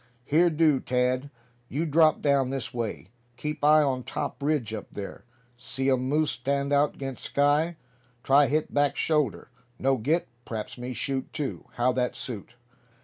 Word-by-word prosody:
"Here 165 Hz, +5 st, +4 dB
do, 155 Hz, -3 st, +3 dB
Tad; 125 Hz, +2 st, 0 dB, 0.4 s
you 155 Hz, +6 st, -1 dB
drop 155 Hz, 0 st, +4 dB
down 140 Hz, -3 st, +3 dB
this 135 Hz, -2 st, -4 dB
way. 115 Hz, -6 st, -4 dB, 0.3 s
Keep 150 Hz, +2 st, -4 dB
eye 155 Hz, +1 st, +6 dB
on 130 Hz, -3 st, 0 dB
top 135 Hz, -, -4 dB
ridge 140 Hz, -7 st, 0 dB
up 110 Hz, -, -5 dB
there. 100 Hz, +3 st, -7 dB, 0.3 s
See 135 Hz, +2 st, -1 dB
um 130 Hz, 0 st, +1 dB
moose 155 Hz, +1 st, +2 dB
stand 140 Hz, +3 st, -1 dB
out 145 Hz, +1 st, +2 dB
'gainst 135 Hz, -2 st, -6 dB
sky. 150 Hz, +4 st, +2 dB, 0.5 s
Try 140 Hz, +3 st, +5 dB
hit 150 Hz, +3 st, -1 dB
back 145 Hz, -1 st, +2 dB
shoulder. 150 Hz, -7 st, 0 dB, 0.3 s
No 135 Hz, +2 st, +2 dB
get, 150 Hz, +9 st, 0 dB, 0.2 s
p'raps 110 Hz, -3 st, -5 dB
me 125 Hz, +1 st, -4 dB
shoot 135 Hz, +1 st, -3 dB
too. 145 Hz, -, -4 dB
How 120 Hz, +1 st, +2 dB
that 125 Hz, -1 st, -1 dB
suit?" 120 Hz, -1 st, -6 dB
135 Hz, 160 wpm, -27 LUFS, 125-150 Hz, 0.5 s, eye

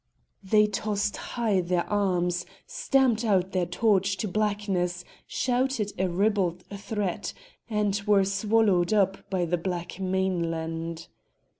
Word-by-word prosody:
They 210 Hz, +2 st, +4 dB
tossed 210 Hz, 0 st, -1 dB
high 220 Hz, -6 st, 0 dB
their 175 Hz, 0 st, -1 dB
arms, 180 Hz, -3 st, 0 dB, 0.2 s
stamped 265 Hz, -, +1 dB
out 190 Hz, -4 st, +2 dB
their 180 Hz, -2 st, 0 dB
torch 195 Hz, +1 st, +2 dB
to 210 Hz, -, -2 dB
blackness, 195 Hz, -3 st, -1 dB, 0.2 s
shouted 250 Hz, -4 st, 0 dB
a 190 Hz, 0 st, +1 dB
ribald 180 Hz, -2 st, +1 dB
threat, 200 Hz, -2 st, -3 dB, 0.4 s
and 205 Hz, -2 st, 0 dB
were 200 Hz, -2 st, +5 dB
swallowed 200 Hz, -2 st, +2 dB
up 195 Hz, -2 st, +1 dB
by 185 Hz, -2 st, 0 dB
the 175 Hz, +1 st, -1 dB
black 175 Hz, +1 st, -4 dB
mainland. 170 Hz, -3 st, -2 dB
195 Hz, 120 wpm, -27 LUFS, 180-210 Hz, 0.4 s, were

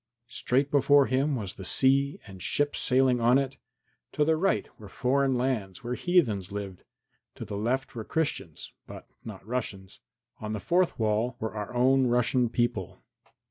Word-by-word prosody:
Straight 130 Hz, +3 st, 0 dB
before 140 Hz, 0 st, +5 dB
him 135 Hz, +3 st, 0 dB
was 100 Hz, -6 st, -4 dB
the 95 Hz, -, -10 dB
sea 135 Hz, +7 st, +2 dB
and 95 Hz, -3 st, -12 dB
ships 145 Hz, +9 st, 0 dB
sailing 130 Hz, -1 st, +3 dB
on 120 Hz, +3 st, +5 dB
it. 135 Hz, -1 st, -2 dB, 0.6 s
To 150 Hz, -, +2 dB
the 160 Hz, +1 st, +3 dB
right 190 Hz, +5 st, 0 dB
were 105 Hz, -2 st, -11 dB
foreign 135 Hz, +4 st, +1 dB
lands, 120 Hz, -7 st, -2 dB
where 120 Hz, +1 st, -3 dB
heathens 120 Hz, -, +1 dB
lived. 100 Hz, -3 st, -6 dB, 0.5 s
To -, -, -7 dB
the 100 Hz, -, -6 dB
left 120 Hz, +6 st, -2 dB
were 115 Hz, -3 st, -5 dB
Christians, 105 Hz, -, -3 dB
but -, -, -11 dB, 0.2 s
not 100 Hz, -4 st, -9 dB
Russians. 105 Hz, -5 st, -5 dB, 0.4 s
On 110 Hz, 0 st, -5 dB
the 105 Hz, -, -3 dB
fourth 175 Hz, -, +1 dB
side 110 Hz, +1 st, 0 dB
were 110 Hz, -2 st, -4 dB
our 105 Hz, -2 st, -5 dB
own 130 Hz, +1 st, +3 dB
Russian 120 Hz, 0 st, +2 dB
people. 95 Hz, -6 st, -2 dB
125 Hz, 165 wpm, -27 LUFS, 105-135 Hz, 0.6 s, before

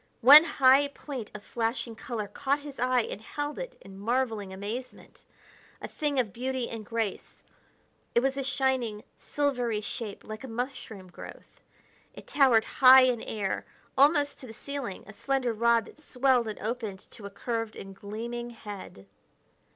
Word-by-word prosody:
One 285 Hz, +6 st, +11 dB
high 275 Hz, -2 st, +5 dB
point 275 Hz, -5 st, -7 dB
of 210 Hz, -, -8 dB
flashing 230 Hz, +1 st, -2 dB
color 225 Hz, -3 st, -5 dB
caught 275 Hz, +8 st, -1 dB
his 285 Hz, -3 st, -10 dB
eye 250 Hz, -1 st, +2 dB
and 205 Hz, -, -6 dB
held 290 Hz, +6 st, -5 dB
it -, -, -7 dB
in 195 Hz, 0 st, -12 dB
marveling 225 Hz, -3 st, -1 dB
amazement. 210 Hz, +7 st, -7 dB, 0.6 s
A -, -, -6 dB
thing 290 Hz, -3 st, -1 dB
of 215 Hz, -7 st, -1 dB
beauty 255 Hz, +1 st, -2 dB
and 225 Hz, -2 st, -6 dB
grace. 225 Hz, -1 st, -4 dB, 0.7 s
It 235 Hz, -, +5 dB
was 270 Hz, +1 st, 0 dB
a 275 Hz, -, -2 dB
shining, 260 Hz, -5 st, 0 dB, 0.2 s
silvery 250 Hz, -7 st, -1 dB
shape 210 Hz, 0 st, -6 dB
like 215 Hz, +3 st, -8 dB
a -, -, -6 dB
mushroom 225 Hz, -6 st, -6 dB
growth; -, -, -12 dB, 0.5 s
it -, -, -11 dB
towered 260 Hz, -6 st, +4 dB
high 260 Hz, 0 st, +8 dB
in 250 Hz, -3 st, +2 dB
air, 205 Hz, -3 st, -3 dB, 0.3 s
almost 285 Hz, +1 st, +4 dB
to 260 Hz, -, -10 dB
the 225 Hz, -, -10 dB
ceiling, 275 Hz, -7 st, -6 dB
a 215 Hz, -, -12 dB
slender 260 Hz, 0 st, -1 dB
rod 235 Hz, 0 st, +3 dB
that 305 Hz, -, -16 dB
swelled 255 Hz, -4 st, +2 dB
and 215 Hz, -, -5 dB
opened 220 Hz, -3 st, -4 dB
to 205 Hz, -3 st, -9 dB
a -, -, -8 dB
curved 225 Hz, +2 st, -4 dB
and 195 Hz, 0 st, -9 dB
gleaming 235 Hz, +4 st, -6 dB
head. 205 Hz, -, -10 dB
240 Hz, 160 wpm, -28 LUFS, 215-265 Hz, 0.7 s, One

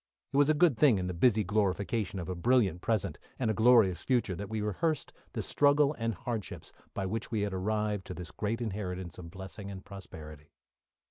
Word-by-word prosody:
It -, -, +1 dB
was 145 Hz, +1 st, +5 dB
a 155 Hz, -, +4 dB
good 150 Hz, -7 st, +4 dB
thing 135 Hz, -8 st, +6 dB
in 90 Hz, -, -2 dB
the 90 Hz, -, -2 dB
busy 110 Hz, +4 st, +3 dB
glorification 100 Hz, +1 st, 0 dB
of 85 Hz, -, -4 dB
a 95 Hz, -, -2 dB
brilliant 95 Hz, -2 st, +2 dB
present, 110 Hz, -1 st, -1 dB, 0.2 s
and 115 Hz, -4 st, +1 dB
a -, -, 0 dB
glorious 110 Hz, -4 st, +5 dB
future, 120 Hz, -8 st, +1 dB
that 100 Hz, +3 st, -6 dB
we 110 Hz, 0 st, -2 dB
rehearsed 105 Hz, -, -1 dB, 0.2 s
the -, -, -2 dB
struggle 145 Hz, 0 st, +3 dB
and 115 Hz, -1 st, -1 dB
hardships 110 Hz, +3 st, -5 dB, 0.2 s
by 95 Hz, -, -1 dB
which 110 Hz, +4 st, -3 dB
we 110 Hz, -3 st, -1 dB
had 100 Hz, -1 st, -1 dB
arrived 105 Hz, +1 st, -1 dB
to 90 Hz, -, -6 dB
this 90 Hz, 0 st, -7 dB
great 110 Hz, +4 st, -2 dB
inheritance 95 Hz, -5 st, -4 dB
of 85 Hz, -2 st, -8 dB
blessing 95 Hz, +2 st, -8 dB
and 95 Hz, -1 st, -8 dB
prosperity. 75 Hz, -6 st, -10 dB
105 Hz, 200 wpm, -31 LUFS, 95-115 Hz, 0.2 s, thing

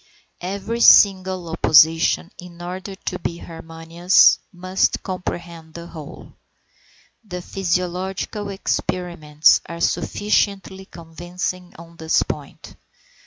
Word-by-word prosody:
Every 200 Hz, +5 st, -4 dB
single 190 Hz, -5 st, +5 dB
opposition 160 Hz, +1 st, +3 dB
in 175 Hz, -1 st, -12 dB
order 185 Hz, +3 st, -7 dB
to 185 Hz, -1 st, -6 dB
be 170 Hz, -, -4 dB
harmonious 165 Hz, +2 st, +2 dB
must 185 Hz, 0 st, -1 dB
comprehend 170 Hz, -3 st, -7 dB
the 170 Hz, 0 st, -8 dB
whole. 160 Hz, -4 st, -11 dB, 0.9 s
The 180 Hz, -4 st, -7 dB
physiological 185 Hz, +3 st, -3 dB
experiments 170 Hz, -5 st, +1 dB
are 170 Hz, 0 st, -8 dB
sufficiently 200 Hz, -1 st, -1 dB
convincing 175 Hz, +2 st, -7 dB
on 170 Hz, 0 st, -14 dB
this 160 Hz, 0 st, +1 dB
point. -, -, -8 dB
175 Hz, 95 wpm, -21 LUFS, 165-190 Hz, 0.9 s, single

